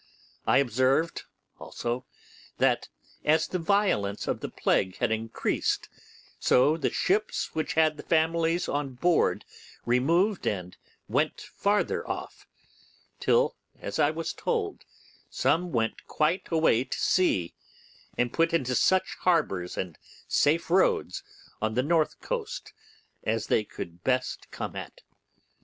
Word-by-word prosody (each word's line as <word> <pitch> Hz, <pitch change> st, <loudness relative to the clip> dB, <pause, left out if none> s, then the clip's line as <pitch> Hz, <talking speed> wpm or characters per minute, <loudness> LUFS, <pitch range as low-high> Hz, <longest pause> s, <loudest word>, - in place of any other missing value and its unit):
I -, -, +5 dB
observed 135 Hz, +5 st, +1 dB, 0.3 s
also 120 Hz, +2 st, -4 dB, 0.5 s
that, -, -, +2 dB, 0.3 s
as 155 Hz, +2 st, +3 dB
the 185 Hz, -, -3 dB
violence 165 Hz, -, +1 dB
of -, -, -1 dB
the -, -, -5 dB
plague 95 Hz, -1 st, 0 dB
had 115 Hz, -, 0 dB
increased, 110 Hz, 0 st, -1 dB, 0.5 s
so 140 Hz, +5 st, +4 dB
the 165 Hz, -, 0 dB
ships 210 Hz, +3 st, 0 dB
which 160 Hz, -1 st, -2 dB
had 155 Hz, -1 st, +2 dB
families 165 Hz, +1 st, +2 dB
on 140 Hz, -3 st, -2 dB
board 170 Hz, +6 st, +2 dB, 0.4 s
removed 170 Hz, -, +2 dB
and 90 Hz, -3 st, -2 dB, 0.3 s
went -, -, 0 dB
farther 205 Hz, +1 st, 0 dB
off, -, -, -6 dB, 0.7 s
till, 485 Hz, +1 st, +3 dB, 0.2 s
as -, -, -5 dB
I -, -, +5 dB
was -, -, -3 dB
told, 430 Hz, -4 st, -2 dB, 0.4 s
some 175 Hz, +2 st, +1 dB
went 115 Hz, -4 st, -1 dB
quite 165 Hz, +5 st, 0 dB
away 160 Hz, -7 st, +3 dB
to -, -, -4 dB
sea, 95 Hz, -, +2 dB, 0.6 s
and 120 Hz, -1 st, 0 dB
put 165 Hz, 0 st, +2 dB
into 130 Hz, -6 st, 0 dB
such 185 Hz, +9 st, +2 dB
harbours 120 Hz, -, +1 dB
and 90 Hz, -4 st, -4 dB, 0.3 s
safe 165 Hz, +3 st, +2 dB
roads 180 Hz, -, +2 dB, 0.4 s
on 110 Hz, 0 st, -1 dB
the 125 Hz, -, +2 dB
north 160 Hz, +1 st, +1 dB
coast 475 Hz, -3 st, -4 dB, 0.5 s
as 110 Hz, +1 st, 0 dB
they 110 Hz, -, +2 dB
could 85 Hz, -4 st, -9 dB
best 130 Hz, 0 st, -1 dB
come -, -, -5 dB
at. -, -, -8 dB
155 Hz, 125 wpm, -28 LUFS, 120-175 Hz, 0.7 s, I